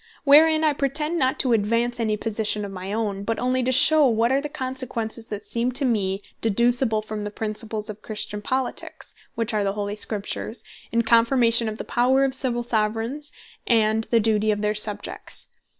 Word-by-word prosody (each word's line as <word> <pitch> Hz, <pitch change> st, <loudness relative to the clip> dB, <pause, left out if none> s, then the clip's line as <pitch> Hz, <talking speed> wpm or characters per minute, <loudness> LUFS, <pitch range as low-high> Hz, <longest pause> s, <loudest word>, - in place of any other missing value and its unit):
Wherein 310 Hz, +2 st, +6 dB
I 305 Hz, -1 st, +3 dB
pretend 300 Hz, +4 st, -1 dB
not 260 Hz, -1 st, +1 dB
to 250 Hz, -3 st, +1 dB
advance 230 Hz, +3 st, 0 dB
any 215 Hz, -2 st, 0 dB
Position 215 Hz, -1 st, -1 dB
of 200 Hz, -, -7 dB
my 190 Hz, 0 st, -6 dB
own, 205 Hz, -2 st, -2 dB
but 225 Hz, +2 st, -2 dB
onely 255 Hz, +1 st, 0 dB
to 255 Hz, +1 st, 0 dB
shew 295 Hz, +4 st, +5 dB
what 230 Hz, 0 st, +1 dB
are 270 Hz, +1 st, +2 dB
the 295 Hz, -, -5 dB
Consequences 255 Hz, -5 st, -4 dB
that 210 Hz, -3 st, -7 dB
seem 240 Hz, +2 st, -1 dB
to 270 Hz, +2 st, +3 dB
me 200 Hz, -5 st, 0 dB, 0.2 s
deducible 230 Hz, 0 st, +1 dB
from 215 Hz, -1 st, -5 dB
the 210 Hz, -, -4 dB
Principles 215 Hz, 0 st, -3 dB
of 215 Hz, -1 st, -5 dB
Christian 210 Hz, -1 st, -3 dB
Politiques, 260 Hz, +3 st, -4 dB, 0.2 s
(which 230 Hz, -1 st, 0 dB
are 210 Hz, -1 st, +1 dB
the 195 Hz, 0 st, -1 dB
holy 205 Hz, 0 st, -4 dB
Scriptures,) 210 Hz, +2 st, -1 dB, 0.3 s
in 235 Hz, 0 st, +1 dB
confirmation 230 Hz, 0 st, +4 dB
of 215 Hz, -, -6 dB
the -, -, -5 dB
Power 255 Hz, +3 st, +2 dB
of 265 Hz, -, -2 dB
Civill 250 Hz, -2 st, -2 dB
Soveraigns, 230 Hz, +6 st, -2 dB, 0.4 s
and 220 Hz, -1 st, +2 dB
the 230 Hz, -, +2 dB
Duty 215 Hz, -1 st, +1 dB
of 210 Hz, 0 st, 0 dB
their 210 Hz, 0 st, +1 dB
Subjects. 210 Hz, -1 st, -2 dB
230 Hz, 185 wpm, -23 LUFS, 215-255 Hz, 0.4 s, Wherein